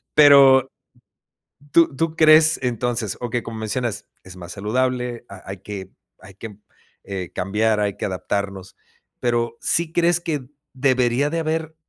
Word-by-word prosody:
Pero 135 -3 +7 1.1
tú 165 -4 +4
tú 165 +3 -2
crees 155 0 +5
entonces, 120 -3 -2
okey, 120 0 -2
como 115 -1 -7
mencionas, 110 +1 -3 0.2
es 95 -1 -12
más 90 0 -9
saludable, 125 +3 -2
ha 100 -1 -12
hay 95 - -6
que 95 -2 -8 0.3
hay 95 0 -15
que 105 0 -10 0.8
cambiar, 105 +3 0
hay 100 -1 -1
que - - -4
adaptarnos. 100 0 -4 0.4
Pero, 120 -1 -1
¿sí 170 -1 +2
crees 175 0 +2
que 150 -7 -4 0.3
debería 130 0 +1
de 165 +2 -2
haber 160 0 -3
120 Hz, 135 wpm, -21 LUFS, 105-145 Hz, 1.1 s, Pero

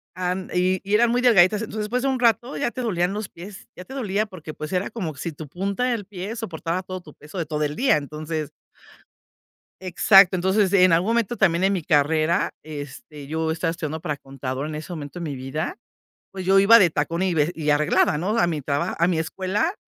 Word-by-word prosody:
And 180 +1 -3
y 185 +1 +1
y 200 +1 -4
eran 235 +2 +4
muy 245 +1 +1
delgaditas. 210 -4 +5
Entonces, 220 -1 -5
después 245 +4 -1
de 275 - +2
un 260 -1 -1
rato 240 +2 +1
ya - - -1
te 255 - -5
dolían 185 -5 0
los 210 -1 -4
pies, 190 +3 -11
ya 180 - -10
te 265 - -11
dolía 215 -5 -1
porque, 170 -7 -9
pues, 155 +4 -7
era 185 +1 0
como 185 -10 -5
si 170 +4 -5
tu 155 0 -9
punta 195 - -2
del 235 -5 -1
pie 200 +2 -6
soportaba 180 -5 -4
todo 185 0 -6
tu 150 -4 -15
peso 150 +6 -12
de 170 - -1
todo 150 0 -2
el 150 0 -2
día. 260 - +3
Entonces 155 +1 -5 1.3
Exacto. 190 +1 +5
Entonces, 190 +2 +2
en 185 -3 +6
algún 175 +6 +2
momento 235 0 +1
también 170 -2 +2
en 195 +1 +3
mi 185 - -1
carrera, 155 +5 +2
este, 145 -1 -9
yo 160 +2 -2
estaba 165 +1 -1
estudiando 160 -2 -4
para 150 -2 -3
contador 135 0 -5
en 155 - -5
ese 155 +4 -7
momento 150 0 -7
de - - -5
mi 150 -4 -4
vida, 135 +5 -4 0.6
pues 190 -2 -7
yo 190 +1 +4
iba 225 +4 +8
de 185 - +5
tacón 165 +4 -1
y 185 -2 +1
ve 155 0 +2
y 155 -2 -1
arreglada, 150 0 +3
¿no? 200 +9 -1
A 230 - +4
mi 160 -4 -2
traba 140 +1 -1
a 170 +1 +2
mi 175 -3 0
escuela 190 - -1
180 Hz, 225 wpm, -23 LUFS, 155-200 Hz, 1.3 s, iba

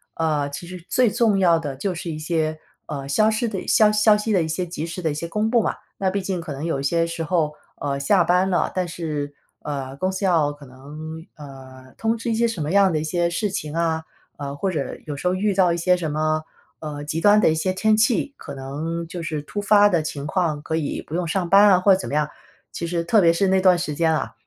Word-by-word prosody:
啊， 155 -3 0
其 145 +5 -7
实 180 -1 -9
最 255 -2 +3
重 220 -4 +2
要 170 -3 +4
的 145 -4 -5
就 185 +8 -2
是 170 - -5
一 155 - -5
些， 155 -1 -1 0.3
呃， 140 -2 -5
消 215 +10 +3
失 220 +2 0
的 195 -4 -5
消 215 -1 +5
消 210 0 +4
息 210 +1 -1
的 185 - +3
一 - - -3
些 170 +3 -2
及 170 -3 -5
时 175 +2 -6
的 160 - +1
一 - - -3
些 170 +3 -4
公 210 +5 -1
布 235 -2 +4
嘛。 - - -1 0.2
那 190 -1 +1
毕 200 +1 -2
竟 185 -2 -2
可 165 - -7
能 140 +3 -5
有 160 -5 -1
一 - - -4
些 165 +4 +1
时 165 0 -4
候， 160 -2 0 0.3
呃， 140 -1 -2
下 175 +7 +3
班 180 +3 +2
了， 180 - +1
但 185 -1 0
是， 150 -4 -4 0.3
呃， 135 -2 -5
公 185 +5 0
司 190 +1 -3
要 160 -5 +3
可 145 -1 -14
能， 150 +5 -9
呃， 130 -3 -12
通 225 +1 0
知 230 +1 -3
一 - - +1
些 235 +1 +2
什 210 -8 -4
么 150 - -2
样 195 -1 +5
的 155 - 0
一 - - -3
些 170 +2 0
事 185 +5 -1
情 155 -5 -4
啊， 160 -1 0 0.3
呃， 140 -1 -5
或 190 +6 -1
者 145 -6 -3
有 150 - -5
时 160 +6 -3
候 180 - +2
遇 205 +2 +1
到 185 -2 +3
一 170 - -2
些 180 +2 +3
什 160 -4 -3
么， 155 +1 0 0.4
呃， 150 -2 -6
极 155 +2 -3
端 205 +2 +6
的 - - +5
一 160 - +1
些 175 +4 0
天 215 +3 +3
气， 230 +5 +2
可 140 - -9
能 155 +5 -4
就 175 +1 -6
是 155 -2 -3
突 205 +7 -5
发 205 0 +5
的 170 -5 +1
情 145 -2 -5
况 155 -3 0
可 160 - -3
以 155 -3 -2
不 155 - -5
用 175 -1 -1
上 175 +1 -1
班 200 +2 +7
啊， 185 -2 +5
或 195 +2 +4
者 185 - +1
怎 - - -5
么 - - -6
样。 150 0 +1 0.4
其 170 - -4
实 170 0 -1
特 210 +6 +3
别 170 -2 +5
是 195 +3 +1
那 190 0 +3
段 185 -1 +5
时 165 -3 -3
间 160 +2 +2
啊， 155 - -2
170 Hz, 285 characters per minute, -22 LUFS, 150-190 Hz, 0.4 s, 班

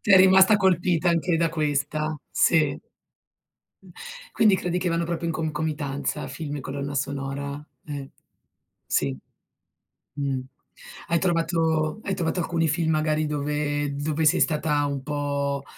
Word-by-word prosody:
Sei 200 -2 +6
rimasta 190 +2 +7
colpita 180 -2 +2
anche 170 0 +2
da 165 0 +2
questa? 155 0 -1
Sì. 155 -4 +3 1.6
Quindi 210 -3 +5
credi 180 -1 -2
che 180 0 -1
vanno 170 0 0
proprio 170 0 -3
in - - -1
concomitanza 150 -2 -2
film 145 +2 -5
e - - -5
colonna 140 +1 -5
sonora? 140 +1 -3 0.2
Eh. 140 -2 -6 0.8
Sì 70 -2 0 1.0
mh. 140 -2 -2 0.7
Hai 170 - +2
trovato 165 -1 0
hai 195 - -2
trovato 170 +1 -1
alcuni 165 -1 0
film 160 +1 +1
magari 155 0 +1
dove 145 0 -1
dove 150 +2 -1
sei 150 - +4
stata 150 -2 +1
un 140 -2 -3
po', 140 -1 -2
155 Hz, 130 wpm, -25 LUFS, 145-170 Hz, 1.6 s, rimasta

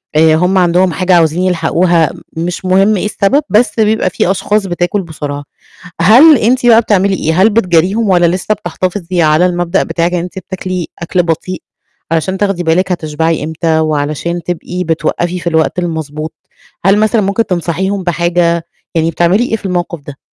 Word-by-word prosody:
آآ 155 0 +4
هُم 180 +3 +1
عندهم 180 0 +2
حاجة 185 0 +1
عاوزين 165 +1 +2
يلحقوها، 170 -2 +1 0.3
مش 175 +3 -4
مهم 195 +3 +3
إيه - - -2
السبب 210 +7 +1
بس 220 +1 +1
بيبقى 215 -3 +2
فيه 180 - 0
أشخاص 205 +1 0
بتاكل 175 +3 -1
بسرعة. 145 -4 -6 0.6
هل 260 - +7
أنتِ 245 +3 +1
بقى 230 -1 +6
بتعملي 200 -3 +1
إيه؟ 165 +1 0
هل 220 - +5
بتجاريهم 195 +1 +1
والّا 175 -2 +3
لسه 180 +5 0
بتحتفظي 185 -3 -3
على 155 +2 +3
المبدأ 175 +1 0
بتاعِك 170 +1 -1
إن 180 - 0
أنتِ 180 +2 -6
بتاكلي 185 -1 -5
أكْل 175 +1 0
بطيء 170 +2 -3 0.5
علشان 175 +4 -1
تاخدي 195 -3 -1
بالِك 180 +3 +1
هتشبعي 160 -2 -1
إمتى 160 0 -1
وعلشان 155 +2 -2
تبقي 180 +1 -4
بتوقَّفي 170 +2 -2
في 175 - -7
الوقت 160 +1 0
المضبوط، 160 -2 -4 0.5
هل 195 +1 +4
مثلًا 215 +1 +2
ممكن 200 +3 0
تنصحيهم 185 +2 -2
بحاجة، 170 -1 0 0.3
يعني 165 0 +1
بتعملي 175 +8 +2
إيه - - +2
في 215 - -9
الموقِف 175 -2 -2
ده؟ 140 - -9
180 Hz, 165 wpm, -13 LUFS, 165-195 Hz, 0.6 s, هل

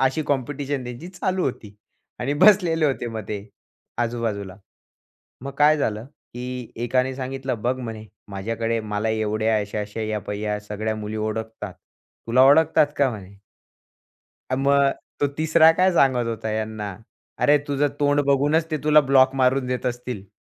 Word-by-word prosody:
अशी 135 +4 +1
कॉम्पिटिशन 140 0 -2
त्यांची 125 +8 -8
चालू 185 0 -2
होती. 110 -5 -5 0.5
आणि 135 +3 -1
बसलेले 180 -6 +5
होते 135 -4 -1
मग 110 -1 -5
ते 105 -1 -3 0.6
आजूबाजूला. 115 -5 -2 0.9
मग 140 - -5
काय 150 +1 +5
झालं, 110 -5 -2
की 125 -3 -8
एकाने 130 +2 0
सांगितलं, 130 -3 -4
"बघ 125 +2 0
म्हणे 110 -3 -7 0.2
माझ्याकडे 115 +3 -2
मला 105 0 -2
एवढे 110 0 -1
अशा-अशा 105 0 -2
या 110 -1 -2
पहा 100 +1 -5
या 105 0 -2
सगळ्या 105 +1 -3
मुली 110 0 -5
ओळखतात. 110 -2 -4 0.5
तुला 120 +3 +4
ओळखतात 155 +1 +5
का 140 -2 +3
म्हणे?" 100 -3 -10 1.1
मग, 140 +1 +3 0.3
तो 145 - +2
तिसरा 160 +1 +5
काय 185 +3 +3
सांगत 130 -6 +3
होता 115 -1 -4
हयाना? 110 -1 -3 0.5
अरे, 150 0 +4
तुझं 145 0 +1
तोंड 145 0 +3
बघूनच 145 +4 +2
ते 155 - 0
तुला 150 0 +6
ब्लॉक 135 -1 +4
मारून 130 0 +2
देत 125 0 -3
असतील. 120 -5 -4
125 Hz, 145 wpm, -23 LUFS, 110-140 Hz, 1.1 s, तुला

